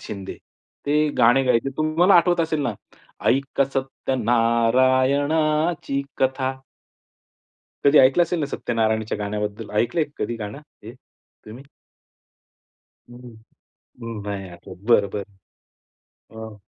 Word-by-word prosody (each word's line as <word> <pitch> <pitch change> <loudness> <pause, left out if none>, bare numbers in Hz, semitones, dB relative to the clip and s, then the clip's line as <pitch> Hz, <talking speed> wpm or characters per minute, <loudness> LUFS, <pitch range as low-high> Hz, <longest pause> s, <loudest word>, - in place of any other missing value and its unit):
शिंदे, 100 -2 -7 0.5
ते 150 +1 +2
गाणं 125 +3 +4
गायचे. 125 +2 +2
तुम्हाला 160 +5 +3
आठवत 175 0 +4
असेल 160 -2 -1
ना, 120 - -1 0.6
"ऐका 135 +1 +1
सत्यनारायणाची 130 +5 +1 0.2
कथा" 130 0 0 1.3
कधी 145 +1 +6
ऐकलं 135 +6 +5
असेल 170 0 -3
ना, 150 - 0
सत्यनारायणच्या 110 -5 -1
गाण्याबद्दल. 105 +1 -4
ऐकलंय 150 +7 0
कधी 115 +2 -3
गाणं 105 +4 -7 0.2
हे 115 +3 -9
तुम्ही? 125 -1 -17 1.5
हं, 120 -2 -14 0.8
नाही 100 -2 -5
आठवत, 85 0 -12
बरं, 105 -4 +4
बरं. 100 -2 -9 0.8
अ 110 -1 -8
130 Hz, 100 wpm, -22 LUFS, 110-145 Hz, 1.5 s, कधी